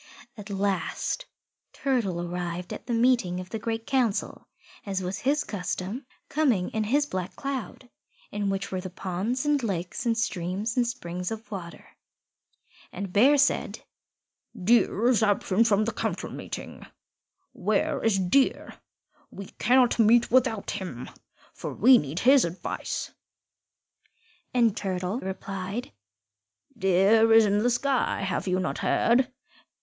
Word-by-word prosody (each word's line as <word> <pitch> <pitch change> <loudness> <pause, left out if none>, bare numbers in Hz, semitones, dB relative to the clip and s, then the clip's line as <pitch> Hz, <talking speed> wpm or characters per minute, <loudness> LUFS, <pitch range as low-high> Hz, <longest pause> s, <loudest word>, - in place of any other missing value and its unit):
At 210 -2 -10
last 200 - -2 0.5
Turtle 230 -10 -1
arrived 175 0 -4
at - - -9
the 240 - -1
meeting 230 -7 +2
of 185 0 -9
the 225 - -3
Great 225 +1 -3
Council, 245 -6 -1 0.4
as 195 -2 -3
was 180 +1 -3
his 290 +3 +1
custom, 200 - -4 0.2
coming 255 -12 +1
in 220 -1 -1
his 285 +7 +2
Black 185 -9 -5
Cloud, 265 -3 -5 0.4
in 205 -1 -1
which 195 0 -3
were 185 -1 -2
the 185 - -6
ponds 195 +9 -3
and 295 -1 +2
lakes 185 -5 -3
and 230 -1 +1
streams 200 +1 -2
and 245 -2 +2
springs 180 -7 -4
of 225 +1 -7
water. 175 -4 -8 1.0
And 195 -1 -6
Bear 270 +8 +6
said, 285 0 +1 0.8
"Deer 225 +2 +3
is 245 -3 +3
absent 205 +1 +2
from 215 -1 +3
the 230 - -2
Council - - -3
meeting. - - -7 0.7
Where - - -1
is 225 -3 +3
Deer? 190 +9 +1 0.5
We 200 -1 -9
cannot 245 0 +3
meet 230 +1 +5
without 245 -5 +2
him, 125 -11 -6 0.4
for - - -6
we 250 +3 +7
need 150 +5 -4
his 265 +1 +6
advice." 170 +2 -4 1.4
And 235 -4 +3
Turtle 190 +2 -2
replied, 195 +3 -5 0.8
"Deer 200 +3 +4
is 225 0 +7
in 205 0 +2
the 240 +3 +2
sky. 260 +1 0
Have 195 0 -2
you 185 0 +1
not 185 - -2
heard? 245 +2 +2
210 Hz, 135 wpm, -26 LUFS, 185-245 Hz, 1.4 s, we